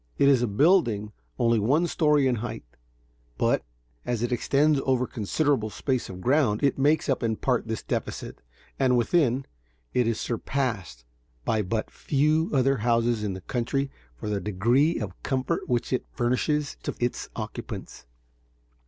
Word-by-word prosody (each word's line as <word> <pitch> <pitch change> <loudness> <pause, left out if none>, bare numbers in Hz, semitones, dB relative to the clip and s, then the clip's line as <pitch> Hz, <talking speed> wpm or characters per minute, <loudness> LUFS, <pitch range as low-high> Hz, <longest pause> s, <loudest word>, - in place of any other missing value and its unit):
It 140 - +4
is 135 -3 +5
a 120 - +1
building 110 - +3 0.3
only 115 -1 +3
one 140 +11 +2
story 150 -4 +3
in 125 -2 +2
height; 115 +1 -5 0.7
but, - - +2 0.4
as 120 -2 -2
it 120 - -1
extends 140 +4 +2
over 130 -2 +2
a - - -3
considerable 130 +1 0
space 130 +3 -2
of 95 -1 -8
ground, 125 -3 +2
it 140 -1 +2
makes 150 +3 +3
up 135 - +1
in 115 -2 0
part 125 0 0
this 110 -1 -3
defect, - - -4 0.4
and 130 -2 +3
within, 130 +1 +2 0.5
it 125 -2 +2
is 115 -1 0
surpassed 115 - -3 0.4
by 110 -1 +1
but 110 +3 -2
few 155 +3 +1
other 135 -1 +3
houses 115 -1 +1
in 100 -2 -1
the 95 - -7
country 135 +7 -2 0.2
for - - -7
the 105 -2 -1
degree 120 - +2
of 100 -5 -6
comfort 130 -1 -1
which 120 +1 0
is 130 - +1
furnishes 145 +5 0
to - - -4
its 120 0 -2
occupants. - - -7
125 Hz, 160 wpm, -26 LUFS, 110-140 Hz, 0.7 s, is